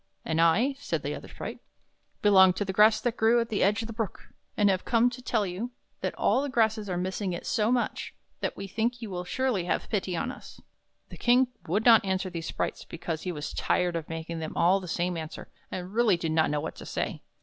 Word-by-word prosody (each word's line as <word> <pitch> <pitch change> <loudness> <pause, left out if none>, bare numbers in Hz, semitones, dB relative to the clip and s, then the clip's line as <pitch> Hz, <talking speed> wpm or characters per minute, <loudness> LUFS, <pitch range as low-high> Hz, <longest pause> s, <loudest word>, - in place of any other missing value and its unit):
" - - -42
And 160 +1 +1
I," 215 +12 +4
said 285 - -3
the - - -2
other - - -8
sprite, - - -7 0.3
" - - -45
belong 190 -3 +7
to 205 - -2
the 190 - -3
grass 215 +2 +6
that 240 0 0
grew 225 +2 +4
at 230 0 -1
the 210 - -1
edge 210 +3 +3
of - - -4
the 230 - -6
Brook, 220 -3 -5 0.3
and 205 - +4
have 190 -2 +2
come 240 +1 +3
to 250 +1 -8
tell 225 -4 0
you 190 +6 -4 0.3
that - - -3
all - - +2
the 285 - -2
grasses 220 -4 +1
are 180 - -1
missing 185 +1 -2
it 170 - -6
so 220 0 +1
much, 250 -1 -1 0.3
that - - -3
we 195 - -5
think 230 +5 -2
you 215 - -6
will 180 -1 -4
surely 245 -4 0
have 175 - -1
pity 190 -4 -1
on 250 - -2
us." - - -12 0.5
The - - -10
King 250 +1 +4 0.2
would 205 +7 0
not 230 -3 +8
answer 190 -1 -1
these 165 -2 -5
sprites, - - -3
because 165 -1 -5
he 180 - -3
was 150 -3 -5
tired 180 -1 +1
of 165 -2 -4
making 165 0 -5
them 160 -1 -5
all 180 +3 +4
the 185 - -8
same 175 +1 -1
answer, 160 0 -7 0.2
and 185 +1 -6
really 225 -5 +4
did 165 -1 -2
not 160 0 +3
know 150 0 0
what 160 - -6
to - - -9
say. - - -3
195 Hz, 245 wpm, -28 LUFS, 175-230 Hz, 0.5 s, not